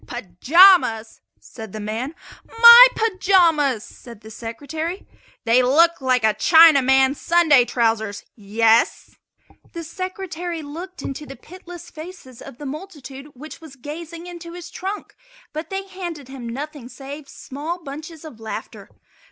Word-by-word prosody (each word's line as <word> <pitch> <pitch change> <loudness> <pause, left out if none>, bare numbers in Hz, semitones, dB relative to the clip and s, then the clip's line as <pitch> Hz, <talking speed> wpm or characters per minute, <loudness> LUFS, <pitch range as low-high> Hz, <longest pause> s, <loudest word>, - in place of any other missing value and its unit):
"Pajamas!" 240 - +3 0.2
said 220 -4 -12
the 215 - -6
man. 225 +8 -5 0.3
"My 470 +2 +9
pajamas!" 350 - +2
said 235 -4 -14
the 220 - -13
Secretary. 295 - -6 0.4
"They 235 +2 +4
look 320 +6 +3
like 255 -2 +1
a 220 -1 +3
Chinaman's 270 - +4
Sunday 320 -7 +4
trousers 225 -4 -2
yes?" 225 +2 0 0.6
The 335 -1 -7
Secretary 350 -1 -6
looked 335 +3 -9
into 290 +2 -7
the 270 - -10
pitiless 355 +1 -13
faces 310 -6 -12
of - - -12
the 295 - -10
multitude 285 -3 -9
which 305 +5 -12
was 310 -4 -13
gazing 330 +5 -9
into 345 -1 -10
his 355 0 -10
trunk, 390 +3 -7 0.4
but 310 +2 -6
they 390 0 -5
handed 345 -8 -8
him 255 -3 -8
nothing 280 0 -8
save 275 +2 -10
small 300 +6 -7
bunches 310 +3 -10
of 255 -8 -12
laughter. 220 -1 -8
295 Hz, 135 wpm, -21 LUFS, 245-345 Hz, 0.6 s, My